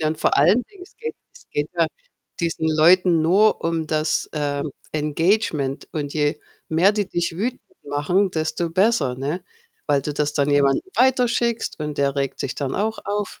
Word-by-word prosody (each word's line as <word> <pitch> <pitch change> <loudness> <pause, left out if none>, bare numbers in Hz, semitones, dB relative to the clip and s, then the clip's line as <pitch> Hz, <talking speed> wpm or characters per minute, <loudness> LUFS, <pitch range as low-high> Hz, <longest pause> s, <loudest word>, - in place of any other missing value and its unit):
Ja, 155 - +1
und 155 0 -3
vor - - +2
allen 180 - +5
Dingen, 400 -3 -16
es 365 - -16
geht 460 0 -5 0.2
es - - -18
geht 145 +1 -1
ja 165 - +4 0.5
diesen 165 -1 -1
Leuten 165 +2 +4
nur 195 +6 +3
um 165 -1 -1
das, 155 0 0
ähm, 145 -1 -2 0.2
Engagement 155 -1 0
und 145 -2 -3
je 150 -1 0 0.3
mehr 175 +6 +4
die 205 -2 -1
dich 170 -1 -2
wütend 240 +7 -2 0.2
machen, 145 +8 +1
desto 160 0 -2
besser, 190 - +2
ne? 145 +8 -3 0.4
Weil 145 -2 +2
du 150 - -3
das 150 0 -1
dann 145 0 +1
jemandem 140 -1 +3
weiterschickst 245 -4 +1
und 150 -1 -4
der 140 -1 +1
regt 135 -1 -2
sich 135 - -3
dann 140 -2 -3
auch 220 +2 -1
auf. 205 0 -3
160 Hz, 180 wpm, -22 LUFS, 145-200 Hz, 0.5 s, allen